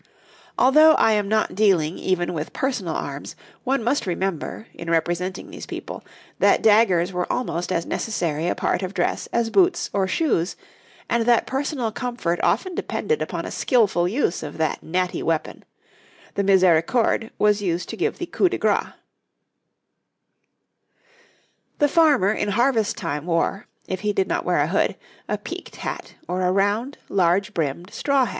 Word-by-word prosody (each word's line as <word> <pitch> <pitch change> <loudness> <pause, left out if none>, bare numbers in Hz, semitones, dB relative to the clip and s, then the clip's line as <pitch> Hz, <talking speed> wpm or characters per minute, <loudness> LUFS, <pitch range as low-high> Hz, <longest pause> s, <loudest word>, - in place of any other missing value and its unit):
Although 305 +5 +6
I 225 - +4
am 210 -2 +1
not 215 0 +1
dealing 185 -6 +2
even 180 -1 0
with 155 -1 -5
personal 215 - -2
arms, 140 0 -5 0.3
one 265 -1 0
must 245 -1 0
remember, 190 +3 -3
in 170 0 -7
representing 175 +3 -1
these - - -9
people, - - -7 0.4
that - - +4
daggers 195 -5 +4
were 180 0 -2
almost 180 -8 -2
as 165 - 0
necessary 170 -7 -2
a - - 0
part - - 0
of 190 +1 -5
dress - - -1
as 235 -1 0
boots 370 -1 +2
or 195 -2 +1
shoes, 190 - 0 0.5
and 235 0 0
that 240 -2 +4
personal 265 -3 -2
comfort 240 -8 -2
often 370 -1 +1
depended 460 +5 -2
upon - - -3
a - - -6
skilful 205 -8 +2
use 200 -3 0
of 150 -2 -7
that 160 -1 -1
natty 180 +2 -1
weapon; 165 -1 -2 0.7
the 200 - 0
misericorde 190 +5 +3
was 210 0 +3
used 175 -3 -1
to - - -4
give 420 +4 -1
the 350 - -4
coup 365 +1 +1
de - - -2
grâce. - - 0 2.8
The 290 - +4
farmer 290 - +4
in 215 - -1
harvest 230 0 +1
time 145 +3 -4
wore, 175 +4 0 0.2
if 185 - -3
he 210 +1 -1
did 195 -1 +1
not - - -1
wear - - +1
a - - +1
hood, - - +1 0.3
a - - 0
peaked - - -8
hat - - -6
or 180 +1 -2
a 180 0 +2
round, 205 +8 0
large 190 +2 +1
brimmed 165 +3 -3
straw 275 -2 +2
hat. - - -4
200 Hz, 165 wpm, -23 LUFS, 175-240 Hz, 2.8 s, Although